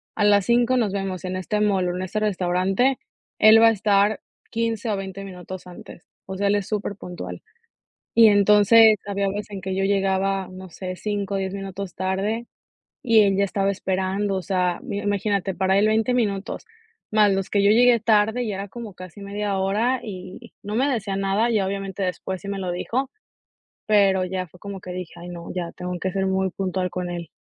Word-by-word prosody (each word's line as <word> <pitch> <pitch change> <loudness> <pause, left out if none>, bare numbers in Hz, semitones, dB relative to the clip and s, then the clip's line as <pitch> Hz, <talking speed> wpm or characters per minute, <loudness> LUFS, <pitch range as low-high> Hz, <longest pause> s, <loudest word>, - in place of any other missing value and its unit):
"A 210 - 0
las 205 -2 +4
5 240 +1 +3
nos 220 -5 +1
vemos 195 -3 -3
en 185 0 -3
este 185 +3 -2
mall 195 -3 +2
o 175 - -3
en 180 - -3
este 185 +3 -2
restaurante", 195 +5 +1 0.4
él 220 +1 +8
va 230 - +8
a - - +6
estar 205 -1 +2 0.3
15 230 -1 -2
o 205 - 0
20 195 0 -6
minutos 185 -1 -9
antes. 175 -1 -12 0.2
O 190 - -6
sea, 200 +1 0
él 200 - +3
es 205 -2 -2
superpuntual. 180 - -5 0.7
Y 230 -1 +7
entonces, 210 +2 +6
había 200 0 -1
veces 205 +2 -5
en 195 -2 -6
que 190 0 -3
yo 195 - 0
llegaba, 195 -1 +1
no 185 0 -10
sé, 185 +2 -6
5 205 -1 -3
10 190 0 -3
minutos 195 -1 -6
tarde, 195 +5 -2 0.6
y 230 -4 +5
él 200 -2 +3
ya 200 - +3
estaba 195 0 0
esperando. 190 +1 -1
O 190 - -2
sea, 180 -2 0
mi 200 - -4
imagínate, 200 -1 -1
para 190 +1 +2
él, 210 +2 +4
20 220 +3 +2
minutos, 205 -5 -2 0.5
más 210 -1 +5
los 195 -1 -2
que 200 - +2
yo 200 +1 +5
llegué 240 +1 +5
tarde, 220 +2 +2
ya 205 - -3
era 195 +1 -5
como 225 -2 -8
casi 185 +1 -11
media 200 0 -3
hora 215 +7 +1
y 190 +3 -9
no 210 +1 -4
me 265 +5 +2
decía 210 -7 -2
nada. 195 +4 +1
Y - - +1
ya, 200 -3 +2
obviamente, 195 0 -4
después 185 0 -3
sí 200 - -9
me 200 0 -3
lo 185 -2 -3
dijo, 255 +9 -2 0.8
pero 195 -3 +4
ya 185 0 -3
fue 180 +1 -19
como 200 0 -7
que 185 - -8
dije: 180 -2 -6
"Ay 175 +1 -9
no, 170 -1 -8
ya 175 -2 -3
tengo 180 0 -5
que 185 +2 -2
ser 195 +1 -1
muy 190 0 0
puntual 185 -1 -2
con 180 -1 -4
él". 175 -1 -5
195 Hz, 205 wpm, -23 LUFS, 185-210 Hz, 0.8 s, él